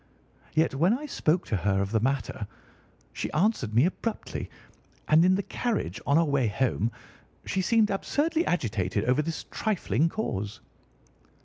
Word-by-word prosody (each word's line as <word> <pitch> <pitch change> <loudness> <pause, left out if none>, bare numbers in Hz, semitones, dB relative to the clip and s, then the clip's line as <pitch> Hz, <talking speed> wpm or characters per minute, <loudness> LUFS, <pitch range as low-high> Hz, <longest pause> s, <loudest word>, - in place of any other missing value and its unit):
Yet 160 -1 +3
when 175 - +3
I 300 - -7
spoke 180 - 0
to - - -1
her 95 +1 +1
of 100 0 -1
the 110 - +2
matter, 120 -4 -1 0.7
she - - -4
answered 155 - +1
me 125 +6 +6
abruptly; 215 +5 -3 0.6
and 155 +2 +6
in 185 +1 +5
the 200 - -1
carriage, 120 - -2
on 140 +2 +4
our 165 - +4
way 140 -5 +1
home, 115 0 0 0.5
she 190 - 0
seemed 220 +2 +3
absurdly 315 +11 0
agitated 105 - 0
over 125 +4 +3
this 160 +1 -4
trifling 170 - 0
cause." 105 - -3
155 Hz, 150 wpm, -27 LUFS, -, 0.7 s, me